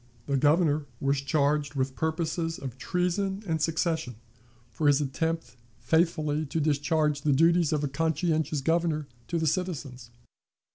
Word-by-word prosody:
The 140 - 0
Governor 150 +1 +3
was 140 0 +1
charged 145 +1 +1
with 130 -1 -1
purposes 165 +1 -1
of 130 -2 -7
treason 190 +5 -1
and 160 -4 -1
secession, 160 -5 0 0.6
for 145 +7 0
his 145 0 +5
attempt 160 +1 -2 0.2
faithfully 155 +3 +1
to 160 - -2
discharge 150 0 +1
the 150 - +1
duties 165 +2 +4
of 150 -1 0
a - - +1
conscientious 160 0 0
Governor 160 0 +1 0.2
to 170 - -1
the 160 - 0
citizens. 145 -8 -3
155 Hz, 140 wpm, -28 LUFS, 140-165 Hz, 0.6 s, his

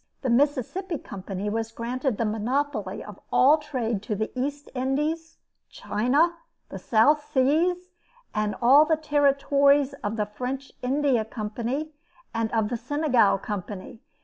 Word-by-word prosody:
The 255 - +1
Mississippi 290 - +1
Company 195 -3 -6
was 225 +1 -2
granted 245 +1 -2
the 230 - 0
monopoly 250 +7 -2
of - - -11
all 290 +5 +5
trade 240 -8 -2
to 215 0 -3
the 215 +2 -3
East 285 +3 -4
Indies, 300 +5 -2 0.3
China, 290 +11 +1 0.3
the - - -7
South 285 +7 +3
Seas, 345 +7 +1 0.4
and 215 -1 -1
all 275 +5 +8
the 315 0 +1
territories 280 -1 +3
of 205 +2 -2
the 210 -2 0
French 255 +6 -5
India 265 -2 +1
Company, 235 +7 -4 0.4
and 230 -1 -1
of 220 -2 +1
the 240 - -2
Senegal 255 -4 +2
Company. 205 +1 -6
255 Hz, 135 wpm, -25 LUFS, 220-290 Hz, 0.4 s, all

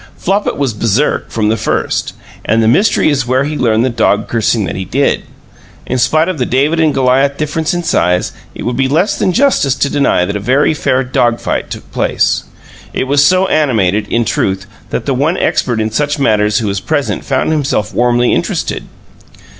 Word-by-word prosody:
Flopit 200 +3 -1
was 135 -5 -1
baresark 115 +6 0
from 105 -2 -1
the 110 - +2
first, 110 - -2 0.3
and 110 +1 +1
the - - +2
mystery 190 - +3
is 135 -3 -1
where 130 +2 +2
he 150 +2 -3
learned 115 -3 +1
the - - +1
dog 105 -2 +1
cursing 115 -1 0
that 85 - -4
he 95 - -3
did. 135 +10 0 0.6
In 130 - -2
spite 155 +6 +2
of 185 -5 -3
the 125 - +1
David 145 +6 +1
and 160 -2 +3
Goliath 135 +1 +2
difference 155 +1 -1
in 175 - -2
size 90 - +1 0.2
it - - -7
would 120 - -2
be 135 +1 +1
less 165 +9 +1
than 185 - +1
justice 230 - +2
to 140 - -1
deny 140 -10 +2
that 100 +3 -4
a - - -1
very 130 +9 +2
fair 130 -3 0
dog 125 -2 0
fight - - -3
took - - -9
place. - - 0 0.5
It - - -1
was 140 +2 +2
so 185 +5 +4
animated, 110 - +1
in 115 +1 0
truth, 95 -2 -1 0.2
that - - -3
the 140 - 0
one 145 +7 0
expert 120 -3 0
in 110 0 -1
such 145 +6 -1
matters 105 -6 +2
who 110 - -1
was 100 -1 -1
present 145 +5 -2
found 135 +3 0
himself 140 -8 -1
warmly 120 0 +2
interested. - - -2
130 Hz, 200 wpm, -14 LUFS, 110-145 Hz, 0.6 s, so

